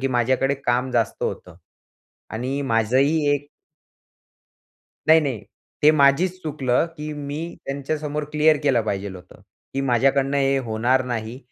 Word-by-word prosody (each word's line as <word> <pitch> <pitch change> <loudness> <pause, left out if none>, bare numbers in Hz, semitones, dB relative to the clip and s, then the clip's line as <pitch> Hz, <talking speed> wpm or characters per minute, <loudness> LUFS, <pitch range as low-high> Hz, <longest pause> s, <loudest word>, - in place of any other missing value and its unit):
की 135 - 0
माझ्याकडे 130 +2 +1
काम 125 +1 +1
जास्त 115 -4 -1
होतं 90 -2 -5 0.7
आणि 130 +5 -3
माझंही 135 +6 +2
एक 145 0 -6 1.6
नाही-नाही, 145 -9 +3 0.4
ते 150 - +8
माझचं 155 +5 +3
चुकलं 140 -2 0
की 150 0 -5
मी 145 0 -5 0.3
त्यांच्यासमोर 150 +2 -3
क्लिअर 150 +1 +4
केलं 135 -5 +3
पाहिजे 100 -1 -3
होतं 90 -1 -13 0.3
की, 135 - 0
"माझ्याकडनं 135 +2 +2
हे 135 0 +2
होणार 120 +4 +1
नाही" 115 0 -4
135 Hz, 125 wpm, -22 LUFS, 120-145 Hz, 1.6 s, ते